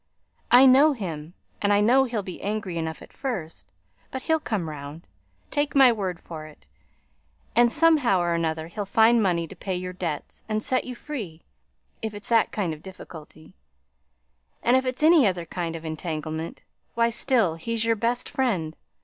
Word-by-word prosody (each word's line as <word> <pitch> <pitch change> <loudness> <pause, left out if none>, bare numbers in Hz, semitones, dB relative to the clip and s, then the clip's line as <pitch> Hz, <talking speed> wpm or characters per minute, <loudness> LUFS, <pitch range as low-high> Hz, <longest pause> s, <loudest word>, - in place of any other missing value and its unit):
I 250 +2 +8
know 275 +4 +6
him; 170 - -6 0.3
and 205 - +2
I 205 - +4
know 250 +6 +4
he'll 230 -5 -3
be 185 -2 -8
angry 205 -3 -3
enough 160 0 -4
at - - -16
first, 190 - -5 0.4
but 260 - -6
he'll 320 -1 +2
come 210 - -3
round, 150 +1 -8 0.5
take 290 0 -1
my 265 -3 +7
word 190 -6 -3
for 155 -2 -9
it; 155 - -17 0.9
and, 240 0 +5
somehow 300 - +4
or 175 -1 0
another, 160 -1 -1
he'll 200 +4 -5
find 225 +3 +4
money 170 -4 +1
to - - -11
pay 190 -2 -4
your 180 0 -4
debts 170 -5 -5
and 215 0 -1
set 255 -1 0
you 250 - -6
free, 220 - -7 0.6
if 220 -1 -4
it's 205 - -4
that 230 -2 +3
kind 185 -6 -2
of 155 - -11
difficulty; 160 -4 -12 1.1
and 240 - +4
if 260 0 +2
it's 255 +3 0
any 315 -6 +6
other 175 -3 -2
kind 165 0 -4
of 165 0 -8
entanglement, 160 0 -5 0.3
why 235 0 +2
still 235 -6 +2
he's 225 +7 -2
your 230 0 +2
best 235 +3 -1
friend. 195 - -1
205 Hz, 175 wpm, -25 LUFS, 165-240 Hz, 1.1 s, I